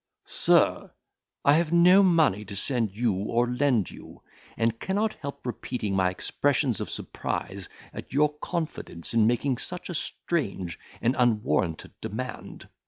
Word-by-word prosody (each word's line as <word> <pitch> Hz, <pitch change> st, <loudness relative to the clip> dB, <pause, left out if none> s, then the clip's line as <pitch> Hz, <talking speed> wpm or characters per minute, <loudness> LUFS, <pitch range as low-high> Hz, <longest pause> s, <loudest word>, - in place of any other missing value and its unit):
Sir, -, -, +2 dB, 0.6 s
I 145 Hz, -, +7 dB
have 165 Hz, +1 st, +2 dB
no 180 Hz, +3 st, +7 dB
money 160 Hz, -, +3 dB
to 100 Hz, 0 st, -7 dB
send 115 Hz, +1 st, 0 dB
you 110 Hz, +2 st, 0 dB
or 115 Hz, +6 st, 0 dB
lend 125 Hz, -5 st, +1 dB
you; -, -, -13 dB, 0.3 s
and 115 Hz, 0 st, 0 dB
cannot 210 Hz, +3 st, 0 dB
help 140 Hz, -2 st, -8 dB
repeating 120 Hz, -4 st, -3 dB
my 95 Hz, -1 st, +3 dB
expressions 130 Hz, +5 st, 0 dB
of -, -, -4 dB
surprise 95 Hz, -2 st, -5 dB, 0.2 s
at -, -, -8 dB
your 150 Hz, +3 st, +3 dB
confidence 155 Hz, -, -4 dB
in 110 Hz, -2 st, +4 dB
making 120 Hz, +2 st, +1 dB
such 180 Hz, +5 st, -2 dB
a -, -, -3 dB
strange 100 Hz, -, -3 dB, 0.2 s
and 120 Hz, +3 st, +2 dB
unwarranted 110 Hz, -8 st, +1 dB
demand. -, -, -6 dB
120 Hz, 140 wpm, -27 LUFS, 105-150 Hz, 0.6 s, I